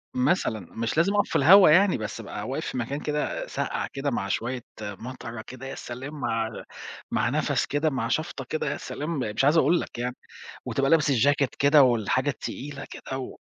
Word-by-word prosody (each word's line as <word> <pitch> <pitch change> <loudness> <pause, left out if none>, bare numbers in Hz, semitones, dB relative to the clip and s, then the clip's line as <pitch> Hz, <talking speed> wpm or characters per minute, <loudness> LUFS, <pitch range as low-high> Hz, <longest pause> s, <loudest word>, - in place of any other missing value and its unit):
مثلًا، 125 - +1
مش 115 +6 -3
لازم 190 +5 +3
أقف 205 - +2
في - - -5
الهوا 180 +5 +8
يعني 190 +4 +5
بس، 105 -1 -5
أبقى - - -6
واقف - - -3
في - - -4
مكان 135 +5 -2
كده 150 0 -2
ساقعة - - -3
كده، 140 0 -2
مع 100 -4 -2
شوية 120 +5 -2 0.2
مطرة 115 +2 -7
كده، 130 +3 -10
يا - - -6
سلام 130 +5 -7
مع 115 -2 -1 0.6
مع - - +1
نفس - - +1
كده 145 +2 0
مع 125 -5 -2
شفطة 150 -1 -2
كده 155 - -1
يا - - -3
سلام، 150 0 -4
مش 110 +1 -1
عايز 155 +3 +5
أقول 160 +3 +4
لَك - - -8
يعني 125 +1 -2 0.5
وتبقى 135 0 0
لابِس 155 -3 +4
الjacket 140 +2 +3
كده 140 +1 +6
والحاجة 130 +3 +2
التقيلة 140 +3 -6
كده 130 - -6
و 130 - -7
135 Hz, 190 wpm, -26 LUFS, 120-150 Hz, 0.6 s, الهوا